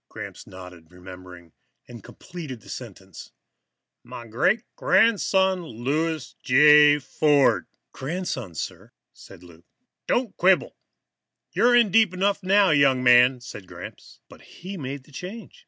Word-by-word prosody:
Gramps - - -10
nodded, 90 -3 -13
remembering, 90 -2 -14 0.3
and 120 -4 -12
completed 150 -10 -10
the - - -17
sentence 95 -7 -11 0.7
"my 120 - -10
great 130 - 0
grandson, 190 -4 +2
Louis 155 +3 -3
J. 150 +2 +6
Ford." 140 - +1 0.2
"Grandson, 135 - -6
sir," - - -8 0.2
said - - -16
Lou. 85 -1 -17 0.4
"Don't 245 -5 -1
quibble. 185 +1 +2 0.8
You're 245 +1 +3
in 235 -5 +3
deep 215 -3 +3
enough 200 +2 0
now, 195 -1 +3
young 140 -3 +3
man," 125 +1 +5
said 105 -6 -11
Gramps, - - -12
but - - -17
he 190 +3 -11
made 140 -4 -7
the 150 - -22
change. 210 - -10
140 Hz, 125 wpm, -23 LUFS, 115-185 Hz, 0.8 s, J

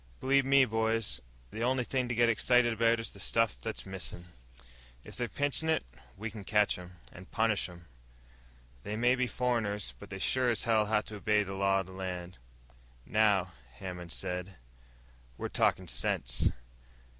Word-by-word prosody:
"Believe 135 0 +3
me, 135 0 +6
boys, 110 - 0 0.3
the 110 - -6
only 125 +1 +2
thing 130 +1 -1
to 120 - -2
get 120 +1 +4
excited 120 +1 +4
about 115 +1 +3
is 115 - -4
the 100 - -13
stuff 115 +2 +1
that's 110 -1 -5
missin'. 95 -2 -6 0.8
If - - -10
they're 120 -1 -1
pinchin' 145 +7 0
it, 160 - +2 0.3
we 110 +3 -4
can 105 -1 -8
catch 105 +1 +3
'em, 90 0 -11 0.2
and 90 +1 -12
punish 110 -4 +1
'em. 85 -1 -13 1.0
They 105 - -4
may 120 +3 +4
be 130 -1 +1
foreigners 110 - -1
but - - -11
they 95 - -5
sure 125 +5 +2
as 115 -3 +1
hell 110 -3 +3
have 105 0 +1
to 105 - -7
obey 105 0 +2
the 95 -1 -6
law 95 0 +2
of - - -8
the 95 - -12
land!" 90 -1 -6 0.7
"Now," 100 -4 +3 0.2
Hammond 90 0 -7
said, 90 +2 -4 0.8
"we're - - -3
talking - - +1
sense." - - 0
110 Hz, 170 wpm, -31 LUFS, 95-120 Hz, 1.0 s, me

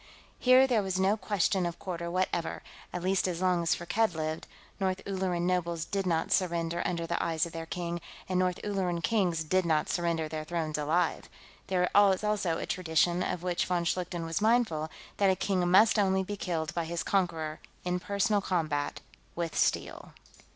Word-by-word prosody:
Here 255 +1 +6
there 240 -5 +2
was 190 -1 -2
no 195 +2 +3
question 200 -3 0
of 170 - -5
quarter 170 -2 -5
whatever, 180 -1 -1 0.3
at 175 0 -4
least 190 0 +1
as 175 -2 -2
long 180 -2 +2
as 170 - +2
Firkked 180 +2 0
lived; 155 0 -3 0.3
North 190 -1 0
Ulleran 185 -3 -1
nobles 170 -2 0
did 195 0 -2
not 165 -2 0
surrender 170 -2 +1
under 170 -2 -2
the 170 +1 -1
eyes 165 -1 +1
of 170 - -8
their 165 0 -6
king, 170 0 -4 0.3
and 185 -1 0
North 180 -1 +1
Ulleran 185 -4 -1
kings 180 -7 +1
did 185 +4 +2
not 155 -3 +1
surrender 170 -2 0
their 155 0 -4
thrones 155 -2 -2
alive. 160 +3 0 0.4
There 180 -1 +2
was 200 -1 +5
also 205 -6 0
a - - -4
tradition, 175 0 +1
of 180 -1 -2
which 180 -1 0
von 175 -1 0
Schlichten 175 -1 -2
was 165 +4 -2
mindful, 215 -9 +2 0.3
that 200 -1 +4
a 190 - +3
king 185 -1 0
must 210 +4 +6
only 190 -1 +2
be 205 +2 -4
killed 165 -5 -3
by 170 -1 -1
his 170 +1 -3
conqueror, 165 -5 -1 0.3
in 180 0 0
personal 200 +2 +1
combat, 155 -7 -1 0.3
with 170 -2 -3
steel. - - -1
180 Hz, 185 wpm, -30 LUFS, 165-190 Hz, 0.4 s, Here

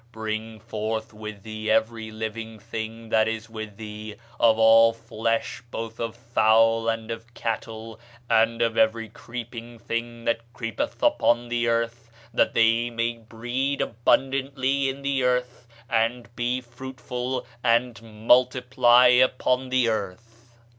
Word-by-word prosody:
Bring 110 0 -5
forth 110 0 -4
with 105 -2 -8
thee 110 0 -5
every 110 0 +1
living 110 +1 -5
thing 115 +1 -6
that 110 0 +3
is 110 0 -4
with 110 -2 -7
thee, 105 -1 -8 0.2
of 110 -1 +5
all 115 0 +6
flesh, 115 0 -2
both 115 -1 -6
of 115 -1 -3
fowl 115 -1 +3
and 115 0 -3
of 115 +1 -7
cattle, 115 0 -4 0.3
and 115 0 +3
of 115 -1 0
every 110 0 +2
creeping 120 +1 -8
thing 115 0 -4
that 115 0 +1
creepeth 115 -3 -4
upon 120 0 +3
the 120 0 0
earth; 115 0 -1 0.2
that - - +2
they 115 +1 +3
may 115 0 -2
breed 120 +5 -3
abundantly 135 +3 +1
in 135 +1 -6
the 140 -1 0
earth, 125 -1 -1 0.2
and 115 +1 -1
be 125 +1 -1
fruitful, 125 +1 -5 0.2
and 120 -1 +2
multiply 125 +2 +4
upon 125 +1 +3
the 130 -2 +2
earth. 115 +3 -4
115 Hz, 135 wpm, -25 LUFS, 110-120 Hz, 0.3 s, all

